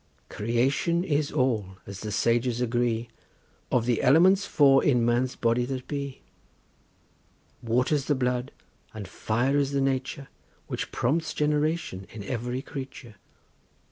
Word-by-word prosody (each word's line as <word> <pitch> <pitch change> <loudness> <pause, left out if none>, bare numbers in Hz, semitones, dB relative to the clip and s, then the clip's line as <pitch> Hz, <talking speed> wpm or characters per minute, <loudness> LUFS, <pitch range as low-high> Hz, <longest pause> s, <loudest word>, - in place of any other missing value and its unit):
Creation 130 +10 0
is 150 -4 0
all, 110 -7 0
as 100 -1 -8
the 105 0 -5
sages 120 +3 +1
agree, 120 -1 0 0.6
Of 120 -2 +2
the 120 -2 +1
elements 185 +8 +5
four 135 -3 +5
in 125 -5 +3
man's 120 +2 +1
body 115 +1 +1
that 130 0 -5
be; 140 -2 -5 1.4
Water's 125 +4 +1
the 145 - +1
blood, 125 0 -1 0.4
and 105 -3 -6
fire 120 +8 0
is 140 0 0
the 140 - +1
nature 135 0 -2 0.4
Which - - -4
prompts 150 +5 0
generation 150 - -1
in 105 -2 -8
every 125 +3 -3
creature. 130 -5 -8
125 Hz, 130 wpm, -27 LUFS, 115-140 Hz, 1.4 s, elements